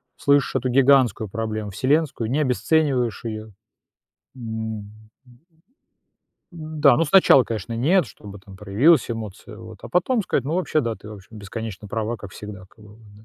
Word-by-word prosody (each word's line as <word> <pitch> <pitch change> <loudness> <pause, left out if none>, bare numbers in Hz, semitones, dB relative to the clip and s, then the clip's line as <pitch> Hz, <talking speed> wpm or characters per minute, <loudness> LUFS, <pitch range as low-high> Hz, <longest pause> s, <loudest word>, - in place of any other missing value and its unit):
слышишь 140 -1 +2
эту 130 0 0
гигантскую 130 -5 +3
проблему 110 0 -4
вселенскую, 130 - 0
не 135 +5 0
обесцениваешь 130 -3 0
ее. 110 -1 -6 0.8
М, 110 -3 -5
м, 100 0 -12 1.6
м-да, 155 -5 +2
ну, 165 - +2
сначала, 150 -6 +6
конечно, 115 0 -5
нет, 160 +7 +2
чтобы 100 -1 -12
там 95 -1 -14
проявилась 105 - +3
эмоция, 110 -1 -7
вот, 110 -2 -11
а - - -8
потом 195 - +1
сказать: 160 - -1
"Ну, 150 +4 -2
вообще, 165 -4 0
да, 115 -4 -2
ты 105 - -13
вообще 100 -3 -12
бесконечно 105 -1 -7
права, 110 +2 -3
как 100 -2 -11
всегда, 105 -3 -9
как 105 - -20
бы, 105 0 -15
вот, 115 - -21
да". 110 - -18
115 Hz, 165 wpm, -22 LUFS, 105-140 Hz, 1.6 s, сначала